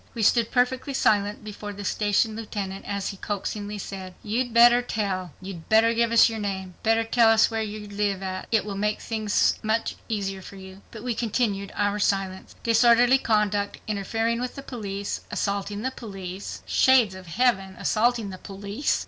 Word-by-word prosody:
We 230 - -1
stood 230 +1 +4
perfectly 260 +2 0
silent 205 -2 +1
before 210 0 -7
the 200 0 -7
station 210 +2 +1
lieutenant 200 -3 -5
as 200 -1 -3
he 195 - -7
coaxingly 205 +1 -4
said, 190 -2 -7
"You'd 240 +4 -1
better 240 +1 +7
tell."—"You'd 190 -5 -4
better 225 +1 +5
give 230 0 +1
us 230 - +7
your 225 -1 -4
name."—"You'd 190 -3 -5
better 225 0 +3
tell 225 0 +4
us 225 +1 +5
where 225 0 -1
you 210 -1 -5
live—it 200 +1 -1
will 205 -2 -4
make 210 +1 -1
things 215 -2 +1 0.5
easier 195 -3 -2
for 195 - -11
you." 190 0 -11
But 220 -1 -10
we 245 -1 -1
continued 210 -4 -1
our 205 0 0
silence. 195 -2 -1
Disorderly 240 +3 +5
conduct, 210 -3 +1
interfering 225 +3 -1
with 250 0 -4
the 275 - -7
police, 200 -6 -4
assaulting 200 +1 -2
the 260 - -1
police 195 -5 -7
(Shades 255 -7 +4
of 185 -1 -11
Heaven! 195 -1 +1
assaulting 230 -2 +1
the 185 - -9
police!) 200 +6 -2
210 Hz, 165 wpm, -25 LUFS, 195-230 Hz, 0.5 s, better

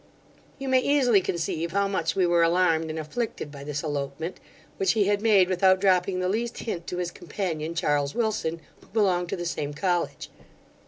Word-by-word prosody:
'You 275 - -6
may 260 -1 +4
easily 255 -6 +3
conceive 170 -1 -2
how 200 0 +2
much 190 -4 -1
we 190 -2 +3
were 170 -1 +3
alarmed 165 -1 +2
and 155 - -4
afflicted 160 0 -4
by 140 -1 -9
this 150 0 -4
elopement, 145 +2 -4 0.4
which 195 - +2
he 220 -2 +3
had 205 0 +1
made 205 -5 +5
without 185 0 +3
dropping 185 -1 +2
the 185 - 0
least 230 +5 -2
hint 175 -7 -5
to 180 - -4
his 175 -1 -2
companion 170 -3 -4
Charles 145 -3 0
Wilson, 210 -8 -1 0.2
who - - -21
belonged 185 -5 +1
to - - -1
the 175 - -5
same 150 -3 -3
college. 175 0 -1
180 Hz, 190 wpm, -26 LUFS, 160-200 Hz, 0.4 s, made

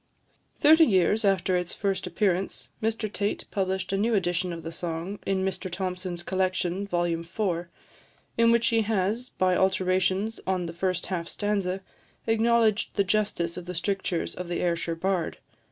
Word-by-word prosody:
Thirty 320 +2 +7
years 210 - +3
after 195 -2 +2
its 180 -1 -1
first 195 -2 -1
appearance, 190 +1 -1
Mr 220 0 0
Tait 205 0 -1
published 190 -1 -1
a - - +2
new 225 +3 +2
edition 180 -1 0
of 165 -1 -6
the 165 - -5
song 170 +3 -4
in 190 -1 +1
Mr 190 -1 -3
Thomson's 180 -1 -3
Collection, 185 +1 -1
vol. 175 -3 +1
iv., 170 +1 -1 0.7
in 230 0 +5
which 235 0 +3
he 230 -1 +3
has, 220 +3 0
by 185 -1 +1
alterations 190 +3 +1
on 185 -2 0
the 165 - -5
first 185 +1 -1
half 175 -2 -3
stanza, 195 -3 -1 0.4
acknowledged 225 -1 +2
the 200 - +3
justice 195 -4 0
of 180 - -6
the 180 - -5
strictures 185 -1 -1
of 180 - -6
the 175 - -2
Ayrshire 170 -1 0
bard. 185 0 -1
190 Hz, 160 wpm, -27 LUFS, 175-205 Hz, 0.7 s, Thirty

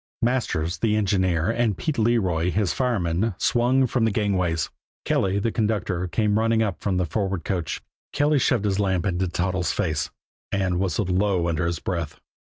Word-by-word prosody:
Masters, 95 -9 0
the 110 -2 +2
engineer, 95 -3 +1
and 115 -5 0
Pete 150 -5 -2
Leroy, 95 -7 +2
his 100 +1 0
fireman, 105 -5 0
swung 125 +2 +3
from 125 -1 0
the 115 - +4
gangways; 90 -7 0 0.3
Kelly, 95 +1 +1
the 110 +3 0
conductor, 105 -5 -1
came 105 +4 +1
running 115 0 +2
up 100 -5 -3
from 95 -3 0
the 90 - +1
forward 95 +1 -2
coach. 90 -5 -2 0.3
Kelly 145 0 +2
shoved 120 -4 +1
his 100 -1 0
lamp 95 -4 +1
into 95 -1 0
Toddles' 90 0 -1
face 75 -2 -1 0.4
and 95 -3 0
whistled 95 0 0
low 95 -2 +1
under 85 0 0
his 85 0 -1
breath. 85 -4 -4
95 Hz, 170 wpm, -24 LUFS, 90-110 Hz, 0.4 s, the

